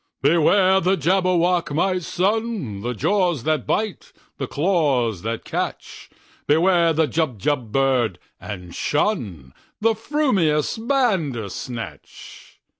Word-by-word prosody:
"Beware 185 +5 +4
the 190 +2 +1
Jabberwock, 180 0 +1
my 185 +3 +1
son! 190 - -2
The 120 +2 -3
jaws 175 - +1
that 155 -3 -1
bite, 215 -2 -2 0.3
the - - -2
claws 140 - +1
that 115 +2 -4
catch! - - -5 0.4
Beware 170 +2 +4
the 160 0 +2
Jubjub 145 - -1
bird, 125 -7 +1 0.2
and 90 -4 -8
shunThe 100 - -2 0.3
frumious 220 - +1
Bandersnatch!" 150 - -3
160 Hz, 100 wpm, -22 LUFS, 125-190 Hz, 0.4 s, Beware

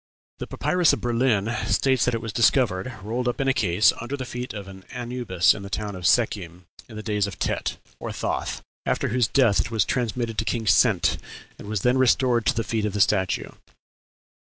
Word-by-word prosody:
"The - - -5
papyrus 180 -3 +2
of - - -2
Berlin" 120 -2 +1
states 130 -3 +2
that 125 - +1
it 115 - -3
was 110 -3 -5
discovered, 115 -2 +2
rolled 120 +4 -2
up 125 - -1
in 135 - 0
a 135 - +4
case, 105 -5 +3
under 125 +4 -4
the 130 - -5
feet 125 +1 -5
of 100 -3 -7
an 95 -1 -11
Anubis 120 -8 +1
in 105 - -8
the 100 - -8
town 105 0 -3
of 90 0 -1
Sekhem, 90 -7 0 0.2
in 110 - -11
the 110 - -6
days 105 -2 0
of 100 - -8
Tet - - -2 0.2
(or - - -5
Thoth), - - -3 0.2
after - - -1
whose 120 -1 +2
death 120 -7 +3
it - - -5
was 110 -4 +1
transmitted 115 -2 -2
to - - +1
King 115 0 -2
Sent, - - +3 0.4
and - - -10
was 105 -2 -2
then 125 +3 +2
restored 125 -2 +3
to 140 - +3
the 115 - 0
feet 110 -1 -1
of 105 - -2
the 105 - -2
statue. 95 -2 +1
115 Hz, 210 wpm, -24 LUFS, 100-125 Hz, 0.4 s, a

